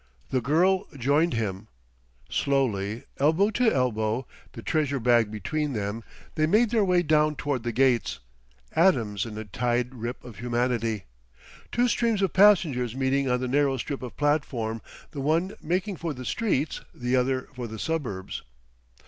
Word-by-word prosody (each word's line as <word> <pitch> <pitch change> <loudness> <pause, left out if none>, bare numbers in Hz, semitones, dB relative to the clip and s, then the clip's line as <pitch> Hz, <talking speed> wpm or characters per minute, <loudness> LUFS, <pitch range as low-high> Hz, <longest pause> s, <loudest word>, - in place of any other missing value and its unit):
The 130 - +1
girl 180 - +2
joined 145 +4 +2
him. 105 -2 -3 0.6
Slowly, 115 -6 0 0.2
elbow 160 +9 +3
to 230 +1 +3
elbow, 120 -1 0 0.3
the 115 - -9
treasure 145 -4 0
bag 120 -2 +3
between 145 +8 -2
them, 105 +1 -3 0.3
they 155 -1 +1
made 215 +6 +3
their 225 -3 +3
way 180 -2 +3
down 155 -1 +3
toward 140 -4 -2
the 120 +1 -2
gates, 125 -1 +2 0.6
atoms 115 - +2
in 105 -1 -7
a 110 - -5
tide 120 +4 -1
rip 120 0 -5
of 120 -6 -11
humanity, 120 -2 -1 0.7
two 245 +1 +2
streams 230 -4 +1
of 190 - 0
passengers 155 - +4
meeting 135 0 +1
on 125 0 +1
the 130 - -1
narrow 135 +1 +2
strip 135 +3 -4
of 125 -2 -8
platform, 130 -7 0 0.3
the 140 - -5
one 165 +7 +1
making 185 +4 -1
for 165 -3 -4
the 125 0 -8
streets, 160 - -1
the 125 +1 0
other 130 0 +1
for 125 -2 -5
the 110 0 -7
suburbs. 125 - -3
130 Hz, 155 wpm, -26 LUFS, 115-155 Hz, 0.7 s, passengers